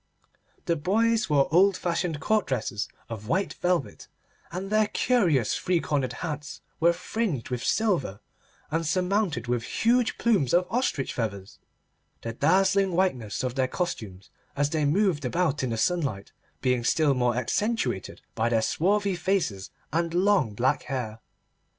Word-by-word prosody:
The 170 - +1
boys 220 +8 +1
wore 140 -2 +3
old 190 +2 +5
fashioned 170 -2 -1
court 215 +6 +1
dresses 110 -4 -2 0.2
of 110 -2 -7
white 190 - 0
velvet, 175 -5 -2 0.4
and 190 +3 -5
their 215 0 +3
curious 175 - +2
three 180 -2 +1
cornered 140 -5 -1
hats 150 -2 -6 0.2
were 170 +1 +5
fringed 170 - -3
with 125 -1 -3
silver 175 - 0 0.5
and 165 +2 0
surmounted 180 - 0
with 120 -1 0
huge 235 - +1
plumes 190 - +2
of 180 +1 +3
ostrich 230 - 0
feathers, 100 -5 -4 0.6
the 115 - -4
dazzling 190 - +3
whiteness 130 - 0
of 125 -1 -1
their 130 0 +1
costumes, 110 - -5 0.2
as 145 +1 0
they 155 -2 +1
moved 170 0 +2
about 150 +3 0
in 130 - -1
the 115 - -2
sunlight, 135 - -1 0.3
being 125 -2 +1
still 145 +3 +3
more 125 -2 +1
accentuated 205 - -1
by 115 +1 0
their 115 -2 +2
swarthy 195 - +1
faces 160 - -1 0.2
and 170 +1 0
long 185 - +2
black 125 +4 +1
hair. 120 -5 -4
160 Hz, 145 wpm, -26 LUFS, 125-190 Hz, 0.6 s, old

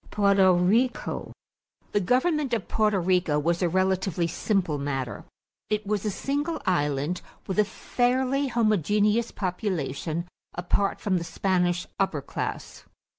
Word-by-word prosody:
=Porto 200 -2 +4
Rico.= 220 +9 +1 0.6
The 205 - +2
government 260 - +1
of 215 - -4
Porto 210 -2 +2
Rico 180 -4 +2
was 170 +4 0
a 175 - +2
relatively 185 -1 +1
simple 170 -2 0
matter. 135 -3 -3 0.4
It 210 0 -1
was 210 0 -1
a - - +1
single 290 - -2
island 145 -2 0 0.2
with 190 +2 -2
a 210 - +5
fairly 260 +5 0
homogeneous 215 - +2
population 170 - -3 0.3
apart 180 +3 0
from 185 -3 0
the - - -4
Spanish 175 -1 0
upper 165 -8 0
class. - - -5
190 Hz, 125 wpm, -26 LUFS, 175-215 Hz, 0.6 s, a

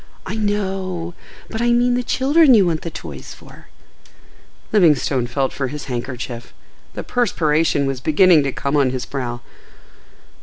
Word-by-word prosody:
"I 190 - -5
know.—But 195 -1 -4
I 240 0 +2
mean 245 +1 +3
the 250 - +1
children 270 +3 +4
you 200 -4 +5
want 165 -3 -1
the 170 - -5
toys - - -9
for?" - - -16 1.0
Livingstone 150 - +3
felt 135 +1 -1
for 135 0 -2
his 145 +2 -7
handkerchief. 120 -2 -6 0.4
The - - -5
perspiration 160 - +1
was 135 -2 -3
beginning 160 +3 +5
to 135 - -1
come 140 +3 -2
on 140 -3 +3
his 125 -1 -4
brow. 120 -3 -5
160 Hz, 145 wpm, -20 LUFS, 135-210 Hz, 1.0 s, you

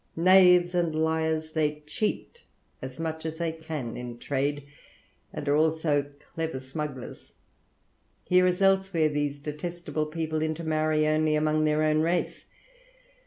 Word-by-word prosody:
Knaves 180 0 +6
and 170 -3 0
liars, 160 0 0
they 150 -1 -1
cheat 220 - -3 0.4
as 130 +2 -8
much 160 -1 -4
as 160 0 -4
they 165 0 -2
can 160 -7 -6
in 120 -1 -7
trade, 140 +2 -2 0.7
and 145 - -6
are 145 - +3
also 155 -2 +1 0.2
clever 160 -4 -3
smugglers. 135 -1 -7 0.9
Here, 180 0 +4
as 180 +2 0
elsewhere, 190 -5 +3
these 145 -1 -2
detestable 155 +1 -4
people 155 0 -3
intermarry 155 -1 0
only 155 0 +2
among 155 0 +1
their 155 0 +2
own 155 0 +2
race. 170 +2 -1
155 Hz, 130 wpm, -27 LUFS, 150-165 Hz, 0.9 s, Knaves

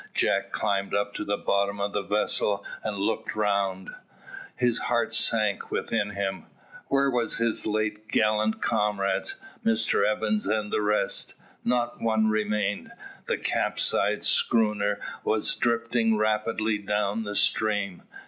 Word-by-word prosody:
Jack 100 0 +1
climbed 100 -2 -1
up 100 0 0
to - - -4
the 100 0 -1
bottom 100 0 0
of 100 0 -2
the 105 - 0
vessel 100 0 -1 0.2
and 105 -2 -3
looked 110 +2 -2
around. 100 -3 0 0.6
His 120 -2 +1
heart 120 -2 0
sank 105 -3 +2
within 105 - -1
him. 95 -3 -4 0.4
Where 140 0 +2
were 120 -2 0
his 115 -1 -1
late 105 0 -2
gallant 110 0 +1
comrades, 105 - 0 0.3
Mr 225 0 +2
Evans 105 -1 0
and 105 0 -1
the - - +2
rest? 105 0 +1 0.3
Not 120 0 0
one 110 -1 +2
remained. 105 -2 -1 0.4
The - - 0
capsized - - +1
schooner 105 -3 +2 0.2
was 110 -1 +1
drifting 115 -1 +1
rapidly 110 0 0
down 105 +1 -1
the 105 -1 -5
stream. 105 -4 +1
105 Hz, 130 wpm, -26 LUFS, 100-110 Hz, 0.6 s, sank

